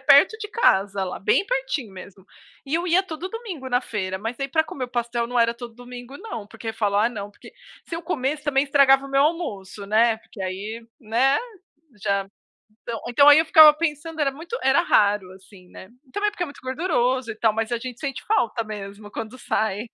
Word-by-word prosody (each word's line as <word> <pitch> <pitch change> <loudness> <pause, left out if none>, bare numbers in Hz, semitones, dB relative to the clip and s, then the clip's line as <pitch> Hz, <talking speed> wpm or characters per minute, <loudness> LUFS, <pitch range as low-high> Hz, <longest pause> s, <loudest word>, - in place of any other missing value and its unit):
perto 285 +10 +6
de 420 -2 -6
casa, 195 - +2
lá, 180 - -5
bem 390 - +2
pertinho - - -2
mesmo, 190 0 -12 0.4
e 280 +3 -3
eu 345 +2 0
ia 360 +2 +4
todo 350 -1 -6
domingo 380 - -7
na 245 0 +2
feira, 190 -6 -4
mas 225 +3 -5
aí, 275 0 -2
pra 315 +3 +2
comer 260 -4 -5
o - - -9
pastel, 240 -1 -2
não 245 +1 -1
era 230 0 +3
todo 235 -1 -9
domingo 245 +2 -10
não, 230 - -7
porque 225 +1 -7
falo: 205 -3 0
"Ah 220 +3 +4
não, 205 -3 -7
porque" - - -16 0.3
se 330 - -5
eu 335 - -5
comesse 300 -2 -2
também 280 -2 +2
estragava 275 -1 +4
o - - -11
meu 275 0 +4
almoço, 210 - -2
né, 225 +2 +3
porque 205 -3 -11
aí, 205 +5 -5 0.2
né, 250 +5 +2 0.6
já 200 -1 0 0.5
então 230 -2 -5
então 280 +4 +5
aí 290 +1 +9
eu 320 - +3
ficava 310 -1 +9
pensando, 320 0 -3
era 275 -2 +2
muito 335 +11 -6
era 270 +5 +4
raro, 205 - +2
assim, 185 -1 -17
né. 190 - -12 0.2
Também 415 0 0
porque 385 -4 -5
é - - -7
muito 285 - -12
gorduroso, 260 -4 0
e - - -11
tal, 220 -1 +2
mas 225 +2 -2
a 235 - 0
gente 250 +1 -7
sente 275 -4 -4
falta 235 - +1
mesmo, 205 -1 -8
quando 230 +3 -7
sai. 215 -2 -1
245 Hz, 210 wpm, -23 LUFS, 215-300 Hz, 0.6 s, aí